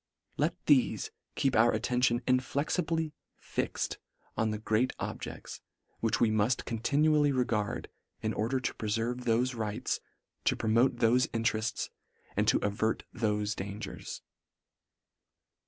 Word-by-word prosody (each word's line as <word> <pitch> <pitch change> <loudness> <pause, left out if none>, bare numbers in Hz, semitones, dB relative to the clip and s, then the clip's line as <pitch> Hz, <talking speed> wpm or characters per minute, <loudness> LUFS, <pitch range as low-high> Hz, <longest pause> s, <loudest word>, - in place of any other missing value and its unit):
Let - - +1
thefe 440 - +3 0.2
keep 135 -2 +1
our 115 +2 +6
attention 120 +2 +1
inflexibly 155 +5 0 0.2
fixed - - -3 0.4
on 110 - +1
the 110 - -1
great 110 +4 +1
objects, - - -6 0.4
which 115 -1 +1
we 115 -2 +4
mull 110 +1 +3 0.2
con 115 -2 -3
tinually 150 +3 +3
regard, 110 -5 0 0.3
in - - -1
order 120 +5 0
to 125 - -2
preferve 115 +3 -2
thofe 120 +2 +2
rights, 110 -2 -2 0.5
to - - +3
promote 115 +4 +3
thofe 120 +2 +4
interefts, 115 -1 -1 0.5
and - - +2
to - - +5
avert 105 +2 0
thofe 105 -2 0
dangers. 100 +2 -6
115 Hz, 120 wpm, -31 LUFS, 110-130 Hz, 0.5 s, our